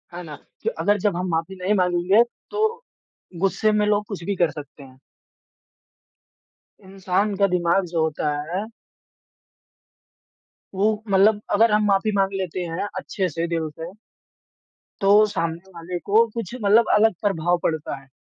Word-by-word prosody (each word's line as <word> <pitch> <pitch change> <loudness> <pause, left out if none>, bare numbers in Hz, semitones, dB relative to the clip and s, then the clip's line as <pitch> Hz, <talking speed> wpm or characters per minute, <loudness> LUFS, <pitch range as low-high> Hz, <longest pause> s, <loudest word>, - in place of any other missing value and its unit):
है 175 - -6
ना? 155 -3 -8 0.3
कि - - 0
अगर 205 0 +2
जब 200 -1 0
हम 180 +1 -2
माफ़ी 165 +3 -2
नहीं 185 +2 -1
माँगेंगे, 180 +3 +3 0.3
तो 440 +3 -1 0.6
गुस्से 195 +3 +1
में 210 0 +2
लोग 210 0 +1
कुछ 200 -5 -6
भी 200 +3 -2
कर 175 -3 +2
सकते 145 -1 -11
हैं। 130 -1 -16 1.8
इंसान 195 +1 -1
का 200 0 +4
दिमाग 180 +1 +1
जो 165 -1 -2
होता 155 -1 -1 0.2
है 190 +4 -2 2.1
वो 210 +2 +1
मतलब 205 +2 +4
अगर 220 +2 +4
हम 210 0 +3
माफ़ी 200 +1 +2
माँग 195 0 +1
लेते 185 -2 -3
हैं, 170 +4 -3
अच्छे 190 -2 -2
से, 165 +2 -3
दिल 165 -2 -2
से 160 +3 -9 1.1
तो 195 - +2 0.2
सामने 170 -2 -4
वाले 170 +2 -5
को 220 +3 +4
कुछ 230 -3 -5
मतलब 215 +3 +5
अलग 220 +1 +4
प्रभाव 175 -4 +1
पड़ता 160 -2 -2
है। 135 - -21
190 Hz, 150 wpm, -23 LUFS, 170-210 Hz, 2.1 s, मतलब